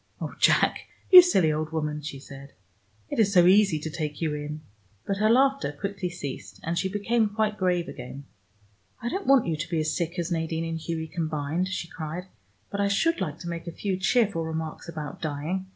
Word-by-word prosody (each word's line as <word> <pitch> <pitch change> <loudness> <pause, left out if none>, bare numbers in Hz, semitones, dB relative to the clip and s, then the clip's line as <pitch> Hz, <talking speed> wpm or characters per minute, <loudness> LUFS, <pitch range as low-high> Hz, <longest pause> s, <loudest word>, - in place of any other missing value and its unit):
"Oh, - - -5
Jack, - - +3 0.2
you 365 -1 +13
silly 190 - +3
old 155 0 -3
woman," 150 -1 -2
she 150 -1 -6
said. 140 0 -12 0.6
"It - - -2
is 205 -3 +4
so 175 -3 +6
easy 195 -2 +5
to 150 +1 -5
take 150 -2 -4
you 160 -3 -1
in." 150 +1 -5 0.4
But 195 - -1
her 215 +2 +3
laughter 270 - +3
quickly 195 +4 -4
ceased, 145 -7 -7
and 165 +1 -2
she 190 +2 0
became 215 +3 +1
quite 215 0 0
grave 180 -3 0
again. 135 +3 -8 0.8
"I 240 -1 -3
don't 385 +8 -4
want 270 -3 +5
you 165 - 0
to 155 +3 -5
be 165 -2 0
as 155 0 0
sick 170 +1 -2
as 175 0 -2
Nadine 165 0 -1
and 165 0 -3
Hughie 160 0 -3
combined," 160 +1 -2
she 185 -2 -4
cried, 165 +1 -6 0.5
"but 200 - -1
I 200 - +2
should 200 +8 +1
like 155 -5 -2
to 175 - -7
make 170 0 -5
a - - -3
few 195 +3 -2
cheerful 195 -2 +2
remarks 160 0 -5
about 155 -3 -6
dying. 160 +5 -3
170 Hz, 205 wpm, -26 LUFS, 155-200 Hz, 0.8 s, you